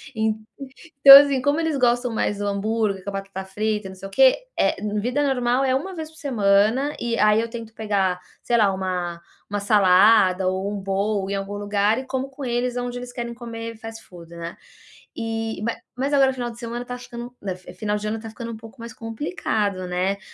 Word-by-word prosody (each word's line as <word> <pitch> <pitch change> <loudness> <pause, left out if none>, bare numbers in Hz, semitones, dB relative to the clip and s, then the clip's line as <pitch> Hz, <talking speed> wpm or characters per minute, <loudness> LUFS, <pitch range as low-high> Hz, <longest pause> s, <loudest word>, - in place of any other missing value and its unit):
En 220 -1 +1 0.7
então 275 0 +13
assim, 280 -2 +4
como 285 +3 +1
eles 320 -3 0
gostam 245 -1 +2
mais 205 -2 -1
do 205 - -2
hambúrguer, 200 -1 -1
com - - -3
a - - -7
batata 195 -1 -5
frita, 210 +1 -2
não 190 - -10
sei 195 +1 -8
o - - -15
quê, 265 +4 +5 0.2
eh, - - +3 0.3
vida 250 +6 0
normal 255 -1 +1
é 260 -1 +2
1 365 +7 -3
vez 315 -1 -6
por 315 - -20
semana, 230 +1 +2
e 235 0 -1
aí 210 +1 +4
eu 230 - -4
tento 225 -2 -8
pegar, 195 -5 0 0.2
sei 235 - +2
lá, 205 -3 +4
uma 180 -2 -3 0.3
uma 205 0 -2
salada 190 -1 +5
ou 190 +2 -1
bowl 195 0 -1
em 200 - -1
algum 195 +1 -4
lugar 205 +2 +1
e 260 - -7
como 265 +1 -3
com 275 0 -8
eles 245 +1 -1
aonde 245 0 -3
eles 245 0 -8
querem 235 -1 -4
comer 230 -1 -7
fast 225 0 -9
food, 170 -2 -14
né, 170 0 -7 0.6
e 225 -2 -3
ma 230 +1 -1 0.2
mas 275 +2 -1
agora 270 -2 +5
o - - -5
final 240 -2 -4
de 230 - -12
semana 240 +1 -5
tá 245 0 -6
ficando, 245 0 -9 0.4
final 210 -1 -1
de 210 0 -4
ano 220 +1 -2
tá 225 - -8
ficando 230 +1 -7
um - - -6
pouco 225 +1 -13
mais 230 0 -8
complicado, 220 - -3
né, 185 +2 -1
225 Hz, 210 wpm, -23 LUFS, 200-245 Hz, 0.7 s, então